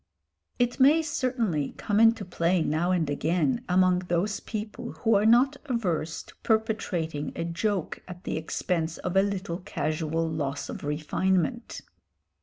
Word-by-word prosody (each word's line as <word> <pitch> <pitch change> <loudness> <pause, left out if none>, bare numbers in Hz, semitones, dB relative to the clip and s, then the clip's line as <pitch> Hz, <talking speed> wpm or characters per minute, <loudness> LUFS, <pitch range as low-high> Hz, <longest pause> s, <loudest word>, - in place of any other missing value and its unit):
It 245 +1 0
may 295 +5 +6
certainly 240 - -1
come 205 0 0
into 225 -2 +5
play 175 -1 +1
now 160 +4 0
and 175 -4 +1
again 175 - 0
among 185 0 +4
those 180 +3 -1
people 215 -1 -6
who 225 -1 +1
are 205 +1 +4
not 255 +5 +5
averse 180 - -1
to - - -16
perpetrating 185 -9 -1
a - - -2
joke 175 +2 -2
at 180 0 -10
the - - -3
expense 160 +1 -2
of 180 - -4
a 195 - +6
little 195 -3 -2
casual 160 -2 -2
loss 145 -3 -3
of - - -6
refinement. 155 +4 -1
180 Hz, 145 wpm, -27 LUFS, 160-220 Hz, -, may